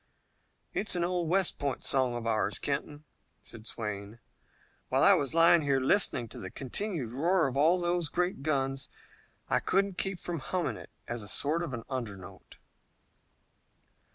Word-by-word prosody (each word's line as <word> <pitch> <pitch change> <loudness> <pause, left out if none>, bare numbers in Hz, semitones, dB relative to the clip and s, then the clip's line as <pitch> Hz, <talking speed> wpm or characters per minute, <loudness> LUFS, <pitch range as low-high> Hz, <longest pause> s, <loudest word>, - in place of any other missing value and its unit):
"It's 210 - +1
an 175 - 0
old 175 -2 -1
West 190 +1 +1
Point 140 -2 -2
song 130 -3 +2
of 120 -1 -5
ours, 110 -3 0
Kenton," 145 +1 -3 0.4
said 115 -1 -9
Swayne. 105 -1 -5 0.7
"While - - +3
I - - +8
was 140 +2 0
lying 165 0 +6
here 140 -2 +2
listening 130 - +3
to - - -9
the 95 - -6
continued 140 - -3
roar 165 +7 +2
of 135 -2 -2
all 160 +6 +4
those 175 -2 0
great 180 -2 -1
guns, 135 -2 -1 0.6
I - - +2
couldn't 195 -1 0
keep 195 -2 -2
from 170 -2 -4
humming 180 +5 -2
it - - -11 0.2
as 120 -1 -3
a 100 - -8
sort 150 +9 +1
of 170 - -3 0.2
undernote." 105 -9 -7
145 Hz, 155 wpm, -30 LUFS, 120-175 Hz, 0.7 s, I